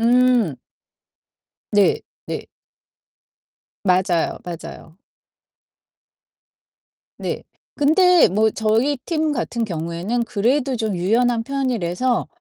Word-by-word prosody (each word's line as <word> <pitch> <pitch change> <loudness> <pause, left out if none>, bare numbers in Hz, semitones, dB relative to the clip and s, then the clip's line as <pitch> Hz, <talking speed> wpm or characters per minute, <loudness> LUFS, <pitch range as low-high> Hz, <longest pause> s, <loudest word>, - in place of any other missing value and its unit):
음. 240 - +3 1.2
네. 205 -1 +3 0.3
네. - - -5 1.4
맞아요, 180 -3 +1
맞아요. 165 -1 -9 2.2
네. - - -4 0.3
근데 355 +4 +5
뭐 215 +4 +2
저희 225 +6 +1
팀 315 -2 0
같은 235 -4 -2
경우에는 175 +6 -2
그래도 255 +6 0
좀 220 -4 -2
유연한 230 +6 +2
편이라서 250 -4 -1
230 Hz, 160 characters per minute, -21 LUFS, 185-255 Hz, 2.2 s, 근데